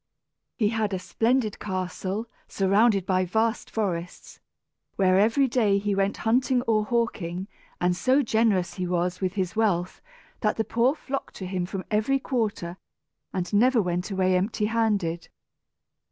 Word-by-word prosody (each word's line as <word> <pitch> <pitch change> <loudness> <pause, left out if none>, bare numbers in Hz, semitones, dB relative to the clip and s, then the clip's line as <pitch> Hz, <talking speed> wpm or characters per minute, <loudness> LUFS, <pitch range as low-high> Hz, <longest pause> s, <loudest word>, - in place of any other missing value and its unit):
He 210 -4 +2
had 215 -3 -1
a - - -1
splendid 225 +4 0
castle, 190 +2 -3 0.2
surrounded 195 0 +2
by 185 -1 +2
vast 220 +5 0
forests, 180 -5 -4 0.6
where 185 -1 +3
every 230 +7 +3
day 220 -5 +2
he 205 0 -1
went 195 +1 0
hunting 250 +2 +2
or 220 -3 +2
hawking; 195 -6 -2 0.3
and 180 0 +2
so 260 +9 +3
generous 220 -6 +1
he 180 -1 -3
was 180 +1 -1
with 185 -1 -1
his 190 -1 -2
wealth 190 -5 0 0.4
that 210 -2 0
the 220 - +1
poor 240 +5 +2
flocked 275 -3 -5
to 190 - -6
him 180 -1 -2
from 190 0 -5
every 215 +6 +2
quarter 215 -10 -2 0.5
and 180 +2 -3
never 245 +4 +4
went 180 -1 -1
away 185 -2 +1
empty 205 +3 0
handed. 205 -7 0
205 Hz, 150 wpm, -26 LUFS, 185-225 Hz, 0.6 s, never